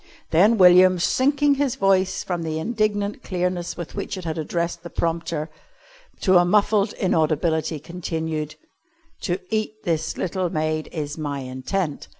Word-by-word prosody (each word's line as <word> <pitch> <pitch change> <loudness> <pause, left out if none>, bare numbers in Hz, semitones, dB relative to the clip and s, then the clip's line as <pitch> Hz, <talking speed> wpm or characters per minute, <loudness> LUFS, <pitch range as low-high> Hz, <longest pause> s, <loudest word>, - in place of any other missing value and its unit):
Then 205 +8 +5
William, 185 0 +7
sinking 280 - +2
his 275 -4 +1
voice 190 -1 +2
from 175 -2 -3
the 160 -1 -3
indignant 210 +2 -1
clearness 180 -1 -2
with 170 -3 -7
which 200 -1 -4
it 185 - -7
had 160 -1 -2
addressed 170 +2 -2
the 170 - -8
prompter, 165 -2 -2 0.7
to 185 -2 +5
a - - +5
muffled 205 +2 +2
inaudibility, 160 -3 0
continued: 160 -2 -4 0.7
"To 175 - -1
eat 215 0 -2
this 160 -2 -1
little 185 0 -1
maid 155 0 -2
is 150 -1 -5
my 145 -2 -3
intent." 135 +6 -3
175 Hz, 145 wpm, -23 LUFS, 160-195 Hz, 0.7 s, William